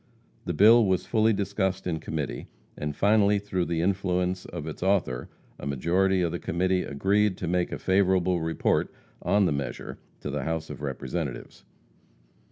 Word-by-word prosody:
The - - -2
bill 115 +6 +7
was 95 -1 +1
fully 110 -1 +3
discussed 95 -2 -1
in 85 -3 -1
committee, 75 -3 -4 0.3
and 75 0 -4
finally, 105 +1 +4
through 95 -3 -2
the 85 -1 -1
influence 90 -1 0
of 75 - -6
its 80 - -7
author, 90 -10 0 0.3
a - - -6
majority 90 +7 +1
of 85 - 0
the 85 - -3
committee 90 +2 0
agreed 95 +7 +1
to 90 - -4
make 90 +1 0
a - - -3
favorable 95 -2 +2
report 80 0 0 0.3
on 100 +3 +3
the - - +1
measure 70 -1 -4 0.2
to - - -4
the - - -2
House 80 0 -3
of - - -8
Representatives. 70 0 -5
90 Hz, 165 wpm, -27 LUFS, 80-100 Hz, 0.3 s, bill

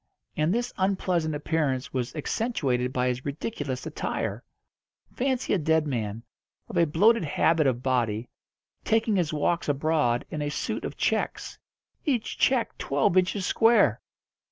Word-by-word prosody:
And 155 +2 +1
this 240 +4 -1
unpleasant 185 -5 0
appearance 145 -4 -1
was 125 0 -2
accentuated 140 - -1
by 125 -1 0
his 125 0 -2
ridiculous 145 - -4
attire. 160 - -3 0.7
Fancy 260 -1 0
a 200 - +2
dead 160 0 +2
man, 115 -5 -3 0.4
of - - -8
a 170 - +4
bloated 210 +9 +4
habit 155 0 +2
of 125 -1 0
body, 120 -3 0 0.6
taking 220 -1 +2
his 175 -5 +1
walks 155 +2 0
abroad 145 -4 +1
in 150 - -3
a 145 - -1
suit 145 - -3
of - - -6
checks - - -1 0.4
each 260 - -1
check 255 -3 +2
twelve 140 +5 +1
inches 185 +1 +2
square! 225 - +4
155 Hz, 140 wpm, -27 LUFS, 130-190 Hz, 0.7 s, a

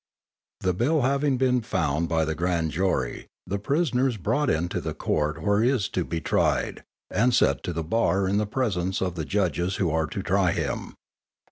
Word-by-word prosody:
_ - - -1
_The 90 - +2
bill 140 - +2
having 140 +1 +2
been 125 -1 +2
found 85 - -1
by 80 -2 +2
the 80 - -1
grand 85 -1 0
jury, 95 +5 -1 0.2
the 100 - -2
prisoner 135 - +1
is 120 -4 -2
brought 145 +9 0
into 85 +2 0
the - - -4
Court 75 +1 -1
where 100 +2 +3
he 120 - +4
is 120 -7 +1
to 90 - -1
be 85 0 -3
tried, - - 0 0.3
and 120 +2 +3
set - - +3
to - - -2
the 80 -1 -3
bar 95 +1 +1
in 100 +2 +1
the 105 - -1
presence 95 -6 -1
of 90 -2 -1
the 80 -3 -4
judges 95 -1 0
who 85 -5 0
are 80 0 +1
to - - -5
try - - +2
him. - - -3
95 Hz, 205 wpm, -25 LUFS, 85-125 Hz, 0.3 s, he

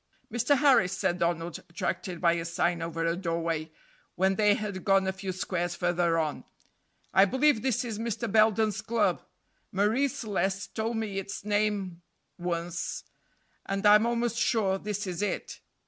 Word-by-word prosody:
"Mr. 245 +4 +3
Harris," 255 -10 +4
said 180 -2 0
Donald, 170 0 -1
attracted 170 +1 -3
by 170 -1 +4
a 170 -1 -2
sign 170 0 0
over 165 0 -2
a 165 0 +1
doorway, 165 -3 -2 0.5
when 190 +2 +2
they 210 0 +4
had 205 -4 -5
gone 195 -1 +3
a 190 - -1
few 190 0 -5
squares 175 -1 -2
farther 175 -1 +1
on, 155 -2 -2 0.7
"I 190 +1 +7
believe 260 +2 +2
this 250 -1 0
is 220 -3 -4
Mr. 230 0 -2
Belden's 215 -1 +3
club. 230 +1 +1 0.5
Marie 215 +8 +2
Celeste 200 -4 -2
told 225 +1 -2
me 210 -3 -2
its 195 +1 -7
name 205 -4 0 0.4
once, 170 0 -3 0.6
and 195 +1 -2
I'm 210 +2 +7
almost 235 0 0
sure 200 -6 +1
this 205 0 -3
is 180 0 -4
it." 210 - -3
195 Hz, 155 wpm, -28 LUFS, 175-220 Hz, 0.7 s, I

